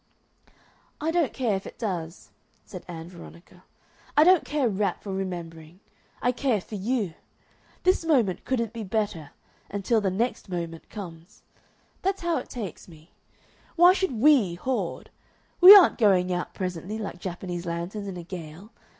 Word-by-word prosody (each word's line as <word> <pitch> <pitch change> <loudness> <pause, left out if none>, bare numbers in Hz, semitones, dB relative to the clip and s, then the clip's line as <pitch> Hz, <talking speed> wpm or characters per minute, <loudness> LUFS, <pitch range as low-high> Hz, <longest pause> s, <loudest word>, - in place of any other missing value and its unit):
"I 315 +2 -1
don't 335 -4 +1
care 240 -6 0
if 190 - -5
it - - -11
does," 175 -6 -5 0.3
said 185 -3 -9
Ann 165 -2 -8
Veronica. 175 +1 -14 0.5
"I 300 - +8
don't 365 +1 +5
care 290 -3 -1
a - - +3
rap 195 -2 -2
for 195 - -5
remembering. 170 -3 -6 0.4
I 245 - +3
care 250 -3 0
for 190 - -14
you. 210 -2 -1 0.7
This 370 -1 +3
moment 250 - +1
couldn't 230 -4 -2
be 230 -2 -5
better 200 -7 -2 0.4
until 205 +3 0
the 195 - +1
next 220 +2 -2
moment 170 -2 -5
comes. 170 -5 -10 0.6
That's 390 0 -1
how 340 -1 +1
it - - -10
takes 210 -9 -7
me. 160 -1 -17 0.6
Why 350 +1 +7
should 380 -6 -1
WE 235 - +4
hoard? 255 +9 -3 0.5
We 370 +3 +12
aren't 380 -9 +6
going 185 -4 +3
out 175 0 -4
presently, 185 +2 -4
like 200 -5 -6
Japanese 175 -1 -5
lanterns 175 +5 -4
in 190 -2 -6
a 175 - -7
gale. 175 +3 -9
195 Hz, 160 wpm, -26 LUFS, 175-250 Hz, 0.7 s, We